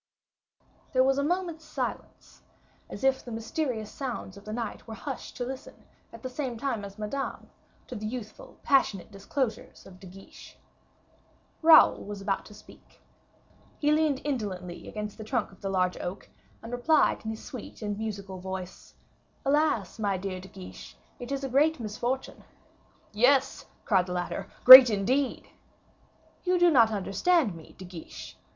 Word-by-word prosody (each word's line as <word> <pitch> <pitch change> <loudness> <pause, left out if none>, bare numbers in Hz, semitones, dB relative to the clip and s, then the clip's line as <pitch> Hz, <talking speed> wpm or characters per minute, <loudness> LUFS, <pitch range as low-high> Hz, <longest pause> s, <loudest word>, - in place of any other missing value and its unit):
There 255 0 +4
was 270 +1 +2
a - - +1
moment's 340 0 -2
silence, - - -6 0.5
as - - -8
if 265 0 +2
the - - -10
mysterious 225 -1 -3
sounds 245 -8 -6
of 200 +1 -14
night 225 +1 -5
were 220 - -7
hushed 275 +3 -7
to 245 - -3
listen, 260 +1 -9 0.3
at 230 - -13
the - - -3
same 255 -2 -4
time 235 -4 -2
as 200 0 -9
Madame, 215 +6 -5 0.3
to - - -9
the 215 -2 -5
youthful 220 -2 -8
passionate 220 -9 +1
disclosures 220 +4 -4
of 185 -1 -14
De 190 - -12
Guiche. 195 +2 -14 1.0
Raoul 320 -1 +7
was 205 0 -7
about 195 0 -2
to 210 - -13
speak. - - -18 0.8
He 295 0 +1
leaned 300 -3 +2
indolently 195 -11 -4
against 210 0 -6
the - - -6
trunk 215 - -2
of 195 - -19
the 195 - -3
large 185 -1 +1
oak, 180 +3 -6 0.3
and 230 - -8
replied 290 +6 +2
in 220 - -4
his 220 0 -6
sweet 245 -2 -9
and 205 -1 -2
musical 200 -4 -5
voice, 190 0 -8 0.5
"Alas, 275 - +1
my 200 -3 0
dear 185 0 -5
De 190 - -11
Guiche, 90 - -11 0.2
it 245 +2 -7
is 275 0 -2
a - - -1
great 290 +4 +2
misfortune." 240 +4 -4 0.7
"Yes," 255 +6 +2 0.2
cried 190 -4 +2
the 180 - -4
latter, 180 -1 -4 0.2
"great 255 -1 +13
indeed." 245 +7 -1 0.9
"You 365 0 +2
do 350 -1 +5
not 230 -6 +6
understand 215 - +1
me, 165 -2 -13
De 185 - -9
Guiche. 175 -3 -10
220 Hz, 160 wpm, -28 LUFS, 195-270 Hz, 1.0 s, great